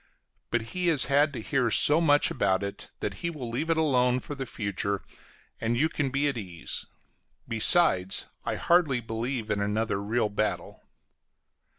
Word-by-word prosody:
But 120 - 0
he 180 -1 -1
has 155 -5 +4
had 145 +2 +2
to 125 - -5
hear 130 -3 0
so 150 +8 +5
much 145 -1 +3
about 100 -10 0
it, 100 0 -7
that - - -2
he 170 - -1
will 150 -7 -7
leave 145 +8 -3
it 165 - +2
alone 125 -5 +2
for 145 - -8
the 135 -2 -6
future, 100 -2 -3 0.6
and 115 +1 -1
you 155 +5 +2
can 145 -4 -2
be 140 +2 0
at 135 -5 -2
ease; 90 -5 -3 0.6
besides, 110 - +3 0.2
I - - -2
hardly 165 -7 +2
believe 115 0 -4
in 100 -1 0
another 105 0 -1
real 110 +1 0
battle. 105 +1 -3
125 Hz, 170 wpm, -27 LUFS, 105-145 Hz, 0.6 s, so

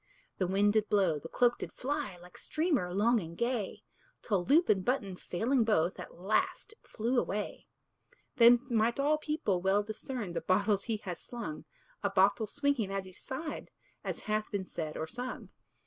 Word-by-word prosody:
The 185 - +1
wind 200 +2 +3
did 215 -1 +2
blow, 190 -7 +3
the 165 - -9
cloak 245 -1 +2
did - - -5
fly, 280 -8 -3
Like 180 +1 -15
streamer 310 - 0
long 225 +5 +3
and 170 -2 -8
gay, 235 -4 -2 0.4
Till 200 -5 +1
loop 315 - +4
and 190 -2 +3
button 205 -6 0
failing 230 +9 +1
both, 185 -6 +1
At - - -8
last 195 - 0
it 445 - -19
flew 240 +3 0
away. 210 -2 -3 0.7
Then 240 0 +8
might 235 0 +1
all 300 +2 +3
people 300 - -1
well 195 +2 +3
discern 215 -2 -5
The 165 - -2
bottles 200 +3 +2
he 225 -3 -1
has 180 -4 -5
slung; 160 -11 -6 0.4
A 200 - +1
bottle 200 +3 +3
swinging 280 -5 0
at 195 -1 -2
each 185 -1 -12
side, 300 +4 -5 0.3
As - - -4
hath 215 0 -1
been 200 -2 -2
said 155 -4 -5
or 160 - -2
sung. 245 +9 -6
210 Hz, 180 wpm, -32 LUFS, 185-245 Hz, 0.7 s, Then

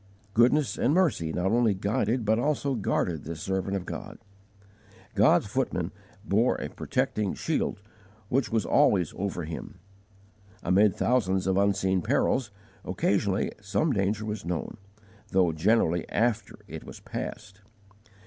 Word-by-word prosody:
Goodness 120 +1 +3
and 140 +6 +2
mercy 150 - +2
not 90 +4 0
only 115 -3 +3
guided 110 +4 0
but 110 +2 +3
also 145 0 0
guarded 90 - -1
this 80 0 -6
servant 95 +2 -2
of 95 -2 -3
God. - - -7 1.0
God's - - +4
footmen - - -2 0.3
bore - - +2
a - - -5
protecting 105 -3 -1
shield 155 -9 -1 0.5
which 130 +3 0
was 110 -1 +1
always 90 -6 +3
over 95 -3 -3
him. 85 +5 -7 0.9
Amid 95 +2 +4
thousands 95 -7 +1
of 95 -1 +1
unseen 95 -1 +2
perils, 125 +6 +1 0.3
occasionally 95 +1 0
some 105 +9 0
danger 105 +1 0
was 105 -1 -4
known, 85 -1 -4 0.5
though 90 -3 +3
generally 85 0 +1
after 115 0 0
it - - -8
was - - -10
passed. 100 -1 -7
100 Hz, 130 wpm, -27 LUFS, 95-115 Hz, 1.0 s, God's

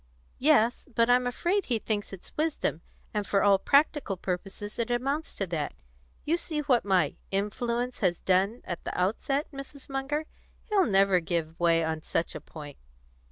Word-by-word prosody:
"Yes; 255 -4 +3
but 230 +1 +4
I'm 250 0 +4
afraid 350 +11 0
he 240 - +1
thinks 210 -1 -2
it's 195 -2 -11
wisdom, 305 - -1 0.3
and 210 -2 -1
for 195 - +2
all 200 -1 +5
practical 280 - +2
purposes 195 +4 -4
it 235 - 0
amounts 275 +6 -1
to 195 - -1
that. 165 -5 -3 0.5
You 330 +3 +2
see 315 -3 -3
what 265 -5 +3
my 185 -7 +2
'influence' 235 +5 -1
has 180 -4 +2
done 195 +5 +1
at 175 - -5
the - - -4
outset, 270 - 0
Mrs. 275 0 -10
Munger. 275 +3 -2 0.4
He'll 410 - +2
never 195 -2 +4
give 165 -1 -3
way 165 -1 +4
on 160 0 -2
such 165 - -1
a - - -6
point." 145 -3 -10
215 Hz, 165 wpm, -28 LUFS, 185-275 Hz, 0.5 s, all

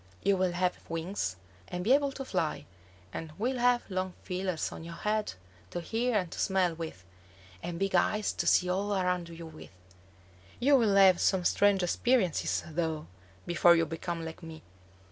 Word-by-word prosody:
You 200 - +3
will 185 -1 +1
have 180 0 0
wings, 165 - -3 0.3
and 180 0 -4
be 235 +7 +4
able 280 0 +3
to 270 - -6
fly; 175 -9 -2 0.5
and 160 -1 -6
will 250 +4 -1
have 245 0 +3
long 185 -1 -3
feelers 185 -2 -2
on - - -8
your 170 0 -8
head 210 +2 -1 0.4
to - - -4
hear 225 +6 0
and 180 -4 -2
to - - -7
smell 190 -3 +2
with, 160 - -7 0.6
and 170 -1 -5
big 195 +2 -1
eyes 210 +4 +2
to - - -2
see 180 - +4
all 200 +3 0
around 180 -2 0
you 165 0 -9
with. 160 -1 -11 0.9
You 280 +3 +5
will 220 -6 +3
have 190 -2 +6
some 185 -2 +2
strange 200 -1 +3
experiences, 195 0 +1
though, 160 -1 -2 0.4
before 175 0 +5
you 165 -1 +2
become 165 +1 -4
like 160 +2 -8
me." 160 -1 -10
180 Hz, 175 wpm, -30 LUFS, 170-205 Hz, 0.9 s, have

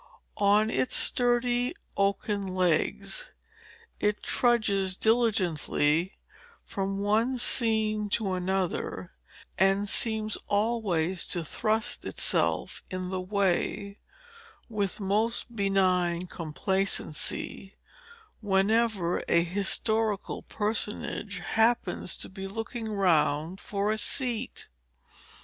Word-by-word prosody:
On 210 +2 +4
its 255 - +1
sturdy 245 +2 +2 0.2
oaken 200 0 0
legs, 185 - 0 0.7
it 210 0 0
trudges 200 -6 +2
diligently 185 -7 +1 0.5
from 195 -1 -3
one 220 +6 +1
scene 220 -3 +1
to 200 -2 0
another, 180 - -2 0.5
and 195 +2 +3
seems 215 0 0
always 200 -5 0
to 175 - 0
thrust 215 +7 -1
itself - - 0
in 185 -1 -4
the 185 -1 -2
way, 200 +1 -1 0.7
with 205 -4 -2
most 220 +4 0
benign 185 -3 +2
complacency, 190 +2 -1 0.7
whenever 200 -2 +1
a 170 - +4
historical 205 +3 0
personage 210 -1 -2
happens 220 -1 +1
to - - -3
be 195 0 -7
looking 225 +3 -5
round 170 -3 +1
for 205 +1 -1
a 220 - -1
seat. 245 -1 -1
200 Hz, 90 wpm, -28 LUFS, 185-220 Hz, 0.7 s, On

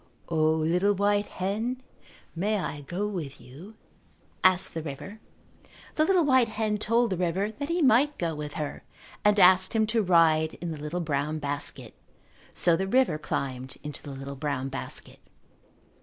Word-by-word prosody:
"O, 155 -1 +2
little 180 +6 +2
white 205 +1 +1
hen, 220 +7 -3 0.6
may 210 +5 0
I 150 -6 -4
go 175 +8 -3
with 160 -9 -5
you?" 150 - -13 0.7
asked 185 0 +4
the 165 - -3
river. 160 +8 -8 0.7
The 310 - +2
little 360 -2 +3
white 260 -4 +4
hen 215 -1 -2
told 230 +1 +1
the 185 - -1
river 185 +4 -1
that 285 +7 -6
he 340 -1 +1
might 275 +3 +4
go 170 -2 -1
with 150 -1 -6
her 150 -4 -4 0.4
and 210 0 +4
asked 185 0 +6
him 220 -1 +3
to 225 +1 +1
ride 165 -4 +3
in 175 -1 -5
the 155 - -6
little 155 +4 -3
brown 150 -1 -1
basket. 145 -1 -4 0.6
So 170 -1 +4
the 190 +3 -2
river 255 -7 +2
climbed 130 -3 -4
into 150 -1 -6
the 145 - -9
little 135 0 -7
brown 135 -2 -3
basket. 135 - -7
180 Hz, 165 wpm, -27 LUFS, 150-210 Hz, 0.7 s, asked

